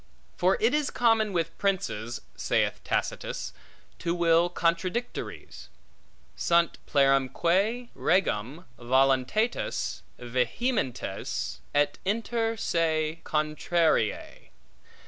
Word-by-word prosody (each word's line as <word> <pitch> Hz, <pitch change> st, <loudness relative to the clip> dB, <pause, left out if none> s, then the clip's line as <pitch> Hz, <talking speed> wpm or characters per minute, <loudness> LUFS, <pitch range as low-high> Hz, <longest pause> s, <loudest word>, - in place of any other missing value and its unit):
For -, -, +2 dB
it 445 Hz, -5 st, +3 dB
is 295 Hz, -2 st, +1 dB
common 225 Hz, -3 st, +2 dB
with 165 Hz, -3 st, -1 dB
princes 180 Hz, -, -1 dB
(saith -, -, 0 dB
Tacitus) -, -, -2 dB, 0.5 s
to 170 Hz, 0 st, -1 dB
will 170 Hz, 0 st, +3 dB
contradictories, 180 Hz, +7 st, -3 dB, 0.7 s
Sunt 170 Hz, -1 st, +2 dB
plerumque 170 Hz, -, +2 dB
regum 150 Hz, -, 0 dB
voluntates 130 Hz, -, +1 dB, 0.2 s
vehementes, 125 Hz, -, -2 dB, 0.2 s
et 145 Hz, 0 st, +2 dB
inter 225 Hz, +2 st, -1 dB
se 160 Hz, -3 st, 0 dB
contrariae. 155 Hz, -5 st, 0 dB
170 Hz, 80 wpm, -27 LUFS, 135-210 Hz, 0.7 s, it